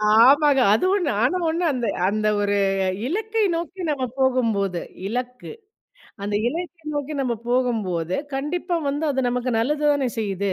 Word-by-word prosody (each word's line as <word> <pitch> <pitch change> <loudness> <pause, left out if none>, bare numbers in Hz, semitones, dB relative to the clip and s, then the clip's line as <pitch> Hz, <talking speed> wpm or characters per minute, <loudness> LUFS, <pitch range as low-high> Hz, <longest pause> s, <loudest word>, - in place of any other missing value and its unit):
ஆமாங்க, 275 +4 +6
அதுவம் 370 - +2
நாங்க 245 - +1
ஒண்ண 330 +2 -1
இருந்து 245 -6 -1 0.2
அந்த 215 +1 0
ஒரு 205 0 +1 0.5
இலக்கை 435 +7 -1
நோக்கி 345 +3 -5
நம்ம 270 -3 -1
போகும்போது, 225 -9 +1 0.3
இலக்கு. 250 +3 -5 0.7
அந்த 205 +1 -2 0.2
இலக்கை 340 +1 -6
நோக்கி 290 +1 -3
நம்ம 250 -3 0 0.2
போகும்போது 205 -9 0 0.2
கண்டிப்பா 340 +6 -2
வந்து 290 +3 -1
அது 265 -2 0
நமக்கு 250 +1 -1
நல்லது 295 +5 0
தானே 275 -3 0
செய்யுது. 200 -2 -1
255 Hz, 135 wpm, -23 LUFS, 220-300 Hz, 0.7 s, ஆமாங்க